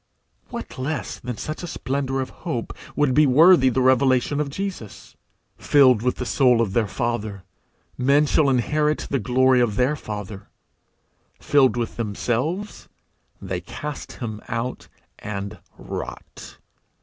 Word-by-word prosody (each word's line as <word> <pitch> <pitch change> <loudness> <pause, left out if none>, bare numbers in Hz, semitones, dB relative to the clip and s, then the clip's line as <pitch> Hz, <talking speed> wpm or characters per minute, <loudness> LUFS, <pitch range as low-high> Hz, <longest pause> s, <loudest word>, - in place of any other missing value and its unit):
What - - -7
less 140 +1 -3
than 125 -2 -6
such 155 - -5
a 175 - -5
splendour 135 -4 -2
of 130 - -5
hope 125 -9 -3 0.2
would 145 -3 +2
be 150 +2 +5
worthy 155 +1 +6
the 130 +1 +1
revelation 130 +2 +3
of 150 -2 -1
Jesus? 185 - -6 0.4
Filled 130 -6 +5
with 125 +1 0
the 125 - -4
soul 125 0 +3
of 110 -5 0
their 110 -1 +1
Father, 105 -2 -3 0.6
men 140 +4 +4
shall 150 0 +3
inherit 150 +4 +1
the 140 - +1
glory 130 +2 +3
of 110 -4 +1
their 130 +6 +2
Father; 105 -5 -7 0.9
filled 135 -4 +3
with 120 -1 -3
themselves, 125 - -3 0.5
they 90 -1 -4
cast 145 - -7
him 110 -3 -6
out, 120 +2 -4 0.3
and 100 -1 -6 0.2
rot. - - -8
130 Hz, 135 wpm, -23 LUFS, 115-145 Hz, 0.9 s, worthy